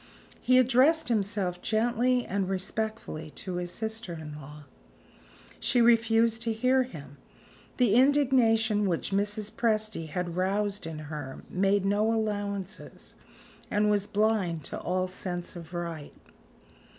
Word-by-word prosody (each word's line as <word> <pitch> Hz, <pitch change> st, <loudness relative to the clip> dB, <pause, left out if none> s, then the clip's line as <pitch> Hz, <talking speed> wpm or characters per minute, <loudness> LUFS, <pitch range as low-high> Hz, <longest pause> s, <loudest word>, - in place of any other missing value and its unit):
He 255 Hz, 0 st, +4 dB
addressed 260 Hz, +5 st, +4 dB
himself 200 Hz, -5 st, -1 dB
gently 240 Hz, +2 st, +1 dB
and 195 Hz, -1 st, -2 dB
respectfully 195 Hz, -4 st, -3 dB
to 185 Hz, -2 st, -4 dB
his 175 Hz, 0 st, -3 dB
sister 220 Hz, -2 st, -4 dB
in 155 Hz, -2 st, -8 dB
law. 150 Hz, 0 st, -11 dB, 1.0 s
She 245 Hz, -, +2 dB
refused 230 Hz, -1 st, +4 dB
to 230 Hz, -1 st, 0 dB
hear 255 Hz, +4 st, +3 dB
him. 145 Hz, -, -8 dB, 0.6 s
The 245 Hz, -5 st, +3 dB
indignation 235 Hz, -5 st, +3 dB
which 170 Hz, +2 st, -2 dB
Mrs. 205 Hz, +2 st, 0 dB
Presty 215 Hz, -7 st, -1 dB
had 175 Hz, +1 st, -3 dB
roused 200 Hz, +1 st, -1 dB
in 160 Hz, -1 st, -6 dB, 0.2 s
her 135 Hz, -3 st, -7 dB
made 195 Hz, +1 st, +2 dB
no 205 Hz, +3 st, +2 dB
allowances, 205 Hz, -3 st, -4 dB, 0.6 s
and 210 Hz, 0 st, +2 dB
was 205 Hz, -1 st, +1 dB
blind 205 Hz, -7 st, 0 dB
to -, -, -5 dB
all 185 Hz, +1 st, -1 dB
sense 180 Hz, -1 st, -5 dB
of 170 Hz, -1 st, -9 dB
right. 170 Hz, -4 st, -6 dB
205 Hz, 125 wpm, -28 LUFS, 180-225 Hz, 1.0 s, He